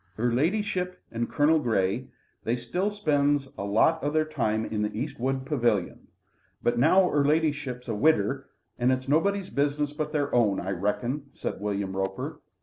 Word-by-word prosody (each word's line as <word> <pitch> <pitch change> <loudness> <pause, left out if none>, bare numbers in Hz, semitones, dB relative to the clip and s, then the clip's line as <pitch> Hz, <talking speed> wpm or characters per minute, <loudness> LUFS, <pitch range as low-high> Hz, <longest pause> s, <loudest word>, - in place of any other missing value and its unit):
"'Er 120 +2 +1
ladyship 180 - 0
and 115 0 -2
Colonel 155 +2 +3
Grey, 100 -8 0 0.4
they 115 - 0
still 150 - -1
spends 145 -8 +1
a - - -5
lot 110 +11 +3
of 145 +1 0
their 155 0 +2
time 110 -8 -1
in 105 -1 -2
the 105 - 0
East 135 +3 -4
wood 130 +1 -1
pavilion. 120 - 0 0.6
But 120 0 +1
now 180 +8 +5
'er 145 -4 +2
ladyship's 145 -4 0
a 115 - -1
widder, 135 +2 +2 0.3
it's 130 +2 +1
nobody's 195 +6 +1
business 145 +1 0
but 150 0 -3
their 145 -2 -1
own, 110 -5 +3
I 95 - -3
reckon," 120 - -2
said - - -4
William 100 -2 -2
Roper. 95 0 -3
135 Hz, 165 wpm, -27 LUFS, 115-155 Hz, 0.6 s, now